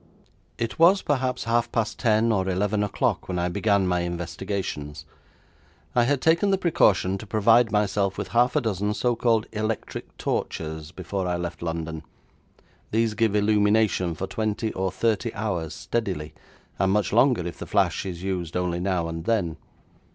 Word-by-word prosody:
It 115 +4 -3
was 185 +4 +6
perhaps 130 -3 0
half 115 +1 +1
past 115 -2 -1
ten 115 -1 +3
or 95 -3 +1
eleven 100 +3 0
o'clock 105 - -1
when 90 - -2
I 90 0 0
began 100 +1 +2
my 90 -1 +1
investigations. 85 -3 -4 0.9
I 120 -1 +3
had 140 +1 +1
taken 170 +5 +3
the 195 - +3
precaution 100 - +2
to 110 - -9
provide 115 +2 +4
myself 100 -2 +1
with - - -4
half 120 +3 +2
a 150 - +3
dozen 105 -2 -1
so 120 +1 +1
called 115 -2 +2
electric 110 0 -4
torches 80 -1 -3
before 95 +1 -4
I 90 0 0
left 85 0 -5
London. 80 -1 -4 0.9
These 115 0 +1
give 110 -1 +1
illumination 105 -4 +2
for 95 - -3
twenty 110 +2 -2
or 95 0 -1
thirty 115 +3 0
hours 90 -7 -3
steadily, 90 -10 -3 0.5
and 95 0 +2
much 105 0 +1
longer 120 -6 +4
if 85 - -6
the - - -6
flash - - +1
is 90 -2 -6
used 90 -3 -2
only 90 -1 -1
now 90 -2 0
and 80 0 -5
then. 90 -8 0
100 Hz, 165 wpm, -25 LUFS, 90-115 Hz, 0.9 s, was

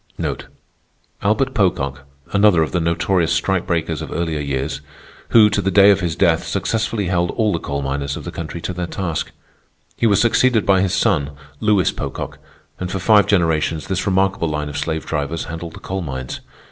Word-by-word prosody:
Albert 130 +6 +1
Pocock, 70 - 0 0.3
another 100 -5 +5
of 80 - -4
the 90 - 0
notorious 85 +1 +1
strike 95 -2 0
breakers 80 -2 -1
of - - -7
earlier 80 -2 -2
years, 70 0 -3 0.5
who, 110 -2 +7
to 105 - 0
the 95 - 0
day 100 +1 +7
of 100 - +3
his 85 -4 -2
death, 80 -1 +2
successfully 110 -2 -1
held 90 -1 +1
all 110 -3 0
the 85 - -1
coal 70 -1 -3
miners 70 +1 -2
of - - -8
the - - -6
country 85 +1 -6
to 90 - -4
their 90 0 -3
task. 85 -4 -3 0.7
He 115 - +2
was 100 -2 +3
succeeded 120 -1 +3
by 95 -1 +4
his 95 -1 +1
son, 75 -6 +1 0.3
Lewis 105 -4 +2
Pocock, - - -6 0.4
and 90 -1 -4
for 95 - -2
five 105 +1 +4
generations 80 -5 +1
this 95 0 -2
remarkable 95 -3 +1
line 75 -1 -3
of 75 - -5
slave 80 -1 -3
drivers 75 +1 -2
handled 85 0 -7
the - - -10
coal 95 +1 -4
mines. 65 -6 -5
85 Hz, 185 wpm, -20 LUFS, 80-100 Hz, 0.7 s, who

